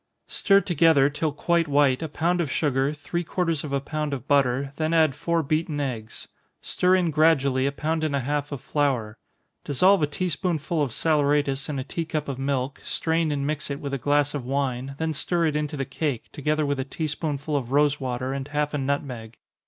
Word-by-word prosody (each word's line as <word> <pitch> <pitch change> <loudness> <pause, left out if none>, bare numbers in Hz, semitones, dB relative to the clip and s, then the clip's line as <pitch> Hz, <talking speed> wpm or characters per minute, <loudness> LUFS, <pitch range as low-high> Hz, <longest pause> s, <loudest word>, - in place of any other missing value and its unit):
_ - - -18
Stir 200 -1 +4
together, 160 -6 +4
till 150 +1 -1
quite 170 +3 +1
white, 140 -2 +3
a 160 - -3
pound 175 +4 0
of 150 -6 -2
sugar, 135 -2 +1
three 150 +4 -4
quarters 165 -3 -1
of 150 - -5
a 140 - +1
pound 150 +1 -3
of 130 +1 -9
butter, 135 -1 +2
then 160 +1 0
add 160 -4 +4
four 170 +3 0
beaten 155 +1 -1
eggs. 115 -6 -5 0.3
Stir 180 +1 +2
in 175 -3 +1
gradually 140 -4 +3
a - - 0
pound 155 +3 -2
and 150 -2 0
a 140 - 0
half 145 +2 -2
of 140 -2 -5
flour. 135 -8 0 0.5
Dissolve 185 +7 +4
a 150 - +3
tea 180 +5 -2
spoonful 165 -3 -1
of 145 - +1
saleratus 145 -1 +1
in 145 - -2
a 130 - -2
tea 165 +4 -4
cup 155 -2 -3
of 135 -2 -4
milk, 135 0 -2
strain 160 -1 0
and 140 -1 -1
mix 150 0 -2
it 140 0 -3
with 140 -1 -5
a 140 - -1
glass 145 +2 +2
of 145 -4 -3
wine, 135 0 -2
then 160 0 -1
stir 170 +3 0
it 155 -2 0
into 150 0 -2
the 135 - -2
cake, 135 -2 -3
together 150 +1 0
with 140 -1 -1
a - - 0
tea 150 +4 -4
spoonful 150 -1 -2
of 130 -3 -2
rosewater, 135 -3 +1
and 135 0 -4
half 150 0 -1
a 145 - -1
nutmeg. 130 -5 -3
145 Hz, 215 wpm, -25 LUFS, 135-155 Hz, 0.5 s, Stir